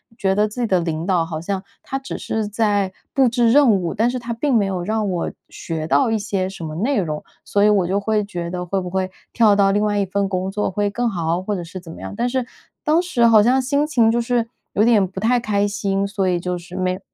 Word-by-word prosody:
觉 190 Hz, -4 st, 0 dB
得 210 Hz, +1 st, +3 dB
自 215 Hz, +4 st, -6 dB
己 235 Hz, -, +1 dB
的 185 Hz, -3 st, +2 dB
领 165 Hz, 0 st, -3 dB
导 180 Hz, -4 st, +2 dB
好 160 Hz, -1 st, -5 dB
像 190 Hz, +2 st, -3 dB, 0.2 s
他 270 Hz, -, -4 dB
只 270 Hz, 0 st, -6 dB
是 220 Hz, -1 st, -2 dB
在 205 Hz, -3 st, 0 dB, 0.2 s
布 270 Hz, -2 st, +5 dB
置 235 Hz, -1 st, +3 dB
任 280 Hz, -2 st, +6 dB
务， 180 Hz, -5 st, 0 dB
但 230 Hz, +3 st, +2 dB
是 250 Hz, -, -3 dB
他 235 Hz, 0 st, -6 dB
并 260 Hz, +4 st, 0 dB
没 220 Hz, -, +4 dB
有 185 Hz, -2 st, -2 dB
让 215 Hz, +1 st, -1 dB
我 175 Hz, -2 st, -2 dB, 0.2 s
学 160 Hz, -1 st, -5 dB
到 245 Hz, +6 st, +3 dB
一 220 Hz, -, +1 dB
些 200 Hz, -3 st, -1 dB
什 190 Hz, -3 st, -8 dB
么 155 Hz, -1 st, -5 dB
内 240 Hz, -, +1 dB
容， 155 Hz, -5 st, -3 dB, 0.2 s
所 200 Hz, -, +1 dB
以 210 Hz, -, +6 dB
我 195 Hz, -4 st, +3 dB
就 195 Hz, +2 st, +1 dB
会 210 Hz, 0 st, 0 dB
觉 175 Hz, -4 st, -5 dB
得 180 Hz, -1 st, -3 dB
会 190 Hz, +2 st, -1 dB
不 180 Hz, -1 st, -5 dB
会 190 Hz, 0 st, -1 dB, 0.2 s
跳 220 Hz, -4 st, +5 dB
到 200 Hz, -1 st, +4 dB
另 205 Hz, +1 st, +1 dB
外 210 Hz, -1 st, +1 dB
一 200 Hz, -, +1 dB
份 195 Hz, +1 st, -1 dB
工 190 Hz, 0 st, -2 dB
作 210 Hz, +1 st, -1 dB
会 205 Hz, +2 st, 0 dB
更 240 Hz, +3 st, 0 dB
好， 170 Hz, -2 st, -1 dB
或 205 Hz, +2 st, -2 dB
者 180 Hz, -, -4 dB
是 175 Hz, +3 st, -8 dB
怎 170 Hz, -2 st, -11 dB
么 -, -, -10 dB
样。 -, -, -7 dB
但 240 Hz, +2 st, 0 dB
是 255 Hz, -1 st, -1 dB, 0.4 s
当 315 Hz, +3 st, +3 dB
时 290 Hz, -10 st, +1 dB
好 225 Hz, -2 st, +7 dB
像 250 Hz, +5 st, +3 dB
心 285 Hz, +3 st, +1 dB
情 235 Hz, -7 st, +3 dB
就 235 Hz, +1 st, +1 dB
是 235 Hz, -1 st, 0 dB, 0.3 s
有 210 Hz, -, +3 dB
点 220 Hz, -4 st, +4 dB
不 190 Hz, +1 st, -7 dB
太 240 Hz, +4 st, +2 dB
开 205 Hz, -3 st, 0 dB
心， 200 Hz, -1 st, -1 dB
所 200 Hz, -1 st, -1 dB
以 175 Hz, -1 st, +1 dB
就 180 Hz, 0 st, -3 dB
是 180 Hz, +1 st, -11 dB
没 185 Hz, 0 st, -1 dB
205 Hz, 285 characters per minute, -21 LUFS, 185-230 Hz, 0.4 s, 好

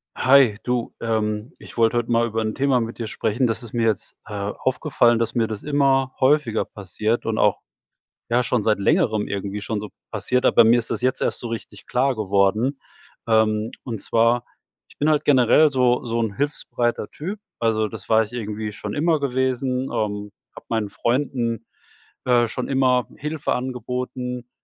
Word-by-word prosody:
Hi, 130 Hz, -5 st, +5 dB
du. 125 Hz, -1 st, -2 dB
Ähm, 110 Hz, 0 st, -1 dB
ich -, -, -13 dB
wollte 115 Hz, +1 st, +3 dB
heut 120 Hz, -1 st, -1 dB
mal 115 Hz, 0 st, +3 dB
über 115 Hz, -1 st, -2 dB
'n 110 Hz, -1 st, -2 dB
Thema 135 Hz, -2 st, +2 dB
mit 115 Hz, +1 st, -5 dB
dir 115 Hz, -, -4 dB
sprechen. 115 Hz, +3 st, 0 dB
Das 115 Hz, -2 st, -1 dB
ist 120 Hz, -3 st, -10 dB
mir 115 Hz, -1 st, +1 dB
jetzt, 110 Hz, -4 st, -1 dB
äh, 105 Hz, -, -9 dB
aufgefallen, 120 Hz, +4 st, +1 dB
dass 115 Hz, -, -1 dB
mir 115 Hz, -2 st, +2 dB
das 110 Hz, -2 st, -5 dB
immer 135 Hz, -2 st, +2 dB
häufiger 130 Hz, -4 st, +2 dB
passiert 105 Hz, +3 st, -3 dB
und 115 Hz, -1 st, -1 dB
auch 105 Hz, -2 st, +2 dB, 0.7 s
ja, 120 Hz, +1 st, +3 dB
schon 120 Hz, -2 st, 0 dB
seit 105 Hz, -1 st, +2 dB
Längerem 110 Hz, -, +2 dB
irgendwie 100 Hz, +1 st, -4 dB
schon 105 Hz, +1 st, -3 dB
so 105 Hz, 0 st, -7 dB, 0.2 s
passiert, 120 Hz, +4 st, 0 dB
aber -, -, +6 dB
mir 115 Hz, +2 st, +5 dB
ist 115 Hz, -, -6 dB
das -, -, -2 dB
jetzt 130 Hz, +1 st, 0 dB
erst -, -, 0 dB
so 120 Hz, -, -5 dB
richtig 115 Hz, -1 st, -7 dB
klar 130 Hz, +1 st, +1 dB
geworden. 105 Hz, +6 st, +1 dB, 0.5 s
Ähm, 110 Hz, -1 st, +2 dB
und 115 Hz, -5 st, -5 dB
zwar 115 Hz, +1 st, +2 dB, 0.4 s
ich -, -, -21 dB
bin 150 Hz, -, +2 dB
halt 150 Hz, -1 st, +2 dB
generell 145 Hz, +3 st, +5 dB
so 125 Hz, -2 st, +2 dB
so 115 Hz, 0 st, -1 dB
'n 110 Hz, -3 st, -1 dB
hilfsbereiter 120 Hz, -5 st, -2 dB
Typ. 190 Hz, +8 st, -6 dB, 0.2 s
Also, 110 Hz, -2 st, +1 dB
das 105 Hz, -2 st, -9 dB
war 110 Hz, 0 st, +5 dB
ich 105 Hz, -, -10 dB
irgendwie 110 Hz, -2 st, -4 dB
schon 105 Hz, 0 st, -6 dB
immer 160 Hz, +1 st, +2 dB
gewesen. 130 Hz, -1 st, -1 dB
Ähm, 105 Hz, -1 st, -2 dB, 0.2 s
hab -, -, -13 dB
meinen 110 Hz, -3 st, -1 dB
Freunden, 120 Hz, -1 st, -1 dB, 0.6 s
äh, 120 Hz, -2 st, +4 dB
schon 125 Hz, +2 st, -4 dB
immer 130 Hz, -2 st, +2 dB
Hilfe 150 Hz, +1 st, -2 dB
angeboten. 125 Hz, -1 st, -4 dB
120 Hz, 180 wpm, -22 LUFS, 110-130 Hz, 0.7 s, aber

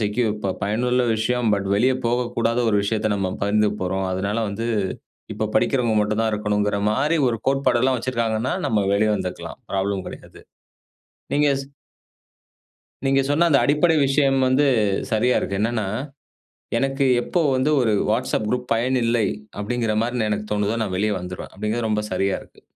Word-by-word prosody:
Secure 105 Hz, +1 st, 0 dB
ப -, -, +1 dB
பயனுள்ள 125 Hz, +5 st, +1 dB
விஷயம். 120 Hz, +2 st, 0 dB
பட் 100 Hz, -1 st, -3 dB
வெளியே 130 Hz, +5 st, +3 dB
போகக்கூடாத 120 Hz, -1 st, 0 dB
ஒரு 105 Hz, -, +2 dB
விஷயத்த 110 Hz, +1 st, 0 dB
நம்ம 95 Hz, -1 st, -1 dB
பகிர்ந்துக்க 105 Hz, 0 st, +1 dB
போறோம். 95 Hz, +1 st, -1 dB
அதனால 100 Hz, +4 st, -1 dB
வந்து 115 Hz, +3 st, -4 dB, 0.7 s
இப்ப -, -, -2 dB
படிக்கிறவங்க 120 Hz, -4 st, +2 dB
மட்டும் 105 Hz, +1 st, 0 dB
தான் 110 Hz, -1 st, +1 dB
இருக்கணும்ங்கிற 105 Hz, -1 st, 0 dB
மாரி, 145 Hz, +8 st, +1 dB
ஒரு 115 Hz, -, -1 dB
கோட்பாடு 135 Hz, -3 st, +2 dB
எல்லாம் 130 Hz, 0 st, +2 dB
வச்சிருக்காங்கன்னா, 115 Hz, -1 st, -1 dB
நம்ம 105 Hz, -3 st, +1 dB
வெளிய 105 Hz, +2 st, +2 dB
வந்துக்கலாம். 85 Hz, -2 st, -6 dB
ப்ராப்ளம் 95 Hz, -1 st, -1 dB
கிடையாது. -, -, -11 dB, 0.9 s
நீங்க 145 Hz, 0 st, +3 dB
சொ 135 Hz, -, -8 dB, 1.4 s
நீங்க 135 Hz, 0 st, +3 dB
சொன்ன 165 Hz, +4 st, +3 dB
அந்த 140 Hz, -, +5 dB
அடிப்படை 150 Hz, +3 st, +3 dB
விஷயம் 135 Hz, -1 st, +2 dB
வந்து 140 Hz, +3 st, +3 dB, 0.5 s
சரியா 120 Hz, +3 st, +2 dB
இருக்கு. 100 Hz, 0 st, -3 dB
என்னென்னா, 110 Hz, -2 st, 0 dB, 0.9 s
எனக்கு 135 Hz, +1 st, 0 dB, 0.2 s
எப்போ 175 Hz, -, -1 dB, 0.2 s
வந்து, 135 Hz, +4 st, +1 dB
"ஒரு 110 Hz, -3 st, +2 dB, 0.2 s
Whatsapp 120 Hz, -1 st, 0 dB
குரூப் 125 Hz, +1 st, -1 dB
பயன் 125 Hz, +3 st, +1 dB
இல்லை 115 Hz, -2 st, +2 dB, 0.3 s
அப்டிங்கிற 115 Hz, 0 st, -1 dB
மாரி 120 Hz, +2 st, -2 dB
நான், 110 Hz, -2 st, 0 dB
எனக்கு 105 Hz, 0 st, -3 dB
தோணுதோ 105 Hz, +2 st, 0 dB
நான் 95 Hz, -3 st, -4 dB
வெளிய 105 Hz, +2 st, +1 dB
வந்துருவேன்" 90 Hz, +1 st, -7 dB
அப்டிங்கிறது 110 Hz, +3 st, -2 dB
ரொம்ப 105 Hz, -1 st, 0 dB
சரியா 95 Hz, +1 st, 0 dB
இருக்கு. -, -, -18 dB
115 Hz, 160 wpm, -22 LUFS, 105-125 Hz, 1.4 s, அந்த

